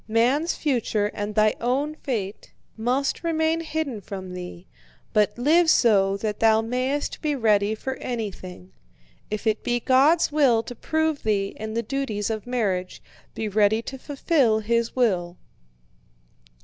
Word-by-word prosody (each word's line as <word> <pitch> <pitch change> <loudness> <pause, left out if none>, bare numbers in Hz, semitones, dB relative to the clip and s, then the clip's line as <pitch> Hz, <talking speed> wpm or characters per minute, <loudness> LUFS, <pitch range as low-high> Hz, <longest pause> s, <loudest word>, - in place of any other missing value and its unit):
Man's 250 +9 +2
future 225 -7 0
and 205 0 -4
thy 215 -1 +4
own 270 +6 0
fate 220 -10 -5 0.2
must 250 +8 -1
remain 320 0 +1
hidden 315 -8 -3
from 190 -2 -7
thee, 180 - -8 0.5
but 210 0 +2
live 320 +7 +4
so 200 -8 +4
that 210 0 -3
thou 220 -1 +5
mayest 255 +5 -2
be 300 -2 0
ready 215 -4 +2
for 265 +4 -5
anything. 190 -6 -6 0.6
If 215 +1 -4
it 220 -1 0
be 240 0 0
God's 280 +8 +3
will 265 -7 +3
to 245 - -7
prove 315 +3 -1
thee 200 -2 0
in 220 0 -6
the 230 - 0
duties 225 -4 -2
of 220 +1 -5
marriage, 195 -7 -2 0.3
be 220 - -3
ready 210 +2 +2
to 265 +2 -7
fulfill 275 -5 +1
His 230 +1 0
will." 180 -8 0
230 Hz, 145 wpm, -24 LUFS, 210-275 Hz, 0.6 s, thou